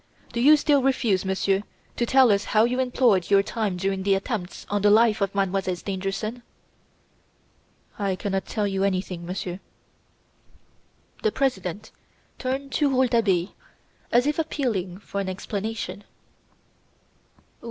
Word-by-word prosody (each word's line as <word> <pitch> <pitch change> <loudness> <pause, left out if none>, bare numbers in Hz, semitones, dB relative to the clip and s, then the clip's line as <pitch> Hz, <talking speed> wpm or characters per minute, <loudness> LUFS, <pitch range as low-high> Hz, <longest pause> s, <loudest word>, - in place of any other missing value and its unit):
"Do 235 - -1
you 300 +4 +7
still 290 -1 +3
refuse, 245 -8 +1
Monsieur, 190 +1 +1 0.3
to 240 - -1
tell 260 -2 +5
us 200 0 +1
how 215 +1 +3
you 245 +2 0
employeeed 245 -8 +2
your 200 0 +5
time 205 -3 -2
during 195 +1 -1
the 195 0 +2
attempts 195 -2 -4
on 205 0 -1
the 205 - +4
life 220 0 +4
of 200 0 -1
Mademoiselle 195 -1 0
Stangerson?" 195 +5 -4 1.6
"I 195 -2 0
cannot 195 0 -3
tell 210 -2 -1
you 195 -1 -1
anything, 185 -3 -2
Monsieur." 180 0 -4 1.6
The 435 - +1
President 210 - -2 0.5
turned 270 +2 -3
to 295 -2 +2
Rouletabille 230 -9 +2 0.6
as 245 +2 +4
if 300 +2 0
appealing 225 - -2
for 200 0 -5
an 190 - -3
explanation. 205 +2 -4
205 Hz, 130 wpm, -25 LUFS, 190-245 Hz, 1.6 s, you